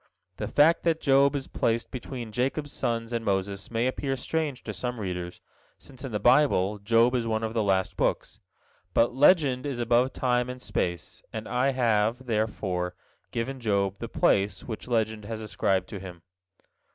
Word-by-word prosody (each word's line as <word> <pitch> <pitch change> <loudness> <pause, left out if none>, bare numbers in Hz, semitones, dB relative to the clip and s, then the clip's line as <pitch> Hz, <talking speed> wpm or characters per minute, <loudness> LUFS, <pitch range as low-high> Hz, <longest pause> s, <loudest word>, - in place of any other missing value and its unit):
The - - -3
fact 160 +3 +4
that 165 -1 +1
Job 140 0 +4
is 135 -1 -2
placed 115 0 -1
between 125 -3 -6
Jacob's 135 +5 -1
sons 115 0 -2
and 115 -1 -1
Moses 100 -1 -2
may 115 +1 0
appear 135 +1 -1
strange 150 -1 -2
to - - -5
some 125 -1 -4
readers, 90 -3 -4 0.4
since 130 0 -12
in 135 - -5
the 105 - -1
Bible 105 -5 +3
Job 115 +4 +3
is 120 -2 0
one 110 0 -1
of 110 0 -2
the 115 - +1
last 95 -2 +1
books; - - -1 0.6
but 120 +1 +3
"legend 140 -2 +4
is 135 -4 -3
above 120 +2 +3
time 125 -1 0
and 125 0 -6
space," 85 -7 -3
and 110 0 -5
I 125 +2 +1
have, 115 0 +1
therefore, 100 -6 -1 0.3
given 130 +3 -3
Job 100 -4 0
the 115 - -5
place 100 -3 +1
which 110 -1 -7
legend 110 -3 0
has 110 0 -5
ascribed 95 -3 0
to 100 - -6
him. 90 -3 -10
115 Hz, 175 wpm, -27 LUFS, 105-130 Hz, 0.6 s, fact